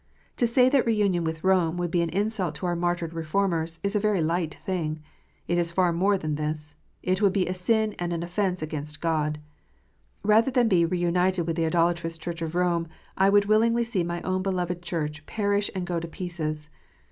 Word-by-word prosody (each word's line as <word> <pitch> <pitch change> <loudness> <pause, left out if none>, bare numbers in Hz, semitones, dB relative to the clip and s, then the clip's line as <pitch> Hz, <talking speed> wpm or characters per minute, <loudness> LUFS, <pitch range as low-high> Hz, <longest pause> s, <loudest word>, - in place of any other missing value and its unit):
To 240 - +3
say 250 +2 +4
that 260 -2 +3
re 225 - +3
union 195 -5 +1
with 160 0 -3
Rome 180 -3 +2
would 175 -1 -2
be 175 - +2
an 170 - 0
insult 195 -3 -1
to 180 - -5
our 175 -1 0
martyred 175 -1 -1
Reformers, 165 0 -1
is 200 +1 -1
a - - +4
very 210 -2 +1
light 165 0 0
thing; 165 -5 -2 0.5
it 175 0 +1
is 170 -1 0
far 180 -1 +2
more 195 +4 +2
than 155 -4 -3
this: 150 0 -4 0.3
it 185 +2 0
would 200 -2 +4
be 190 -2 +2
a 180 - -1
sin 215 +4 +1
and 175 0 -2
an 170 0 -2
offence 180 -1 -1
against 150 -1 -5
God! 155 -2 0 0.8
Rather 215 +4 +4
than 250 -3 +3
be 180 -5 +4
re 180 +2 -1
united 180 +1 +1
with 165 0 -2
the 165 -1 +1
idolatrous 165 0 +1
Church 170 +1 -6
of 165 0 -3
Rome, 175 -2 +1 0.3
I 195 +1 +4
would 205 0 +4
willingly 230 +3 +3
see 230 -6 -1
my 170 0 -4
own 185 0 0
beloved 180 -2 -2
Church 155 -4 -3
perish 205 -1 0
and 185 -1 -2
go 175 -1 -1
to 170 - -6
pieces. 155 -3 -5
175 Hz, 210 wpm, -26 LUFS, 165-195 Hz, 0.8 s, say